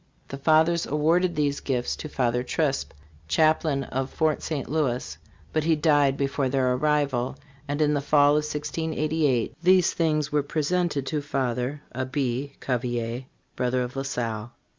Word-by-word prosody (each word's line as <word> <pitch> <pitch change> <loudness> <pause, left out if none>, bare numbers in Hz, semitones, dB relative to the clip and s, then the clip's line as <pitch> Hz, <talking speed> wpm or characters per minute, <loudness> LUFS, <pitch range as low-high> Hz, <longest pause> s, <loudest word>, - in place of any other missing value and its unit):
The 135 - -5
fathers 160 +3 +3
awarded 170 +4 +2
these 145 -2 0
gifts 125 -3 -1
to 155 - -6
Father 125 -3 0
Chrisp, 135 - -1 0.4
chaplain 155 - +2
of 135 +1 -3
Fort 155 0 0
St. 145 -5 -3
Louis, 130 - -1 0.4
but 155 - +1
he 160 0 +3
died 145 -3 +3
before 140 -1 0
their 130 -1 +2
arrival, 140 -2 0 0.3
and 145 +2 0
in 150 0 +2
the 145 - 0
fall 145 0 +4
of 150 - +3
1688 150 -2 -1
these 180 0 +4
things 155 -3 0
were 150 0 +2
presented 155 0 -1
to 150 +1 -2
Father 135 0 -2
[Abbe] 130 +1 -2
Cav 125 -3 -1
elier, 120 0 -3 0.3
brother 125 0 0
of 125 +1 -6
La 135 - -1
Salle. 120 -4 -3
145 Hz, 155 wpm, -25 LUFS, 130-155 Hz, 0.4 s, fall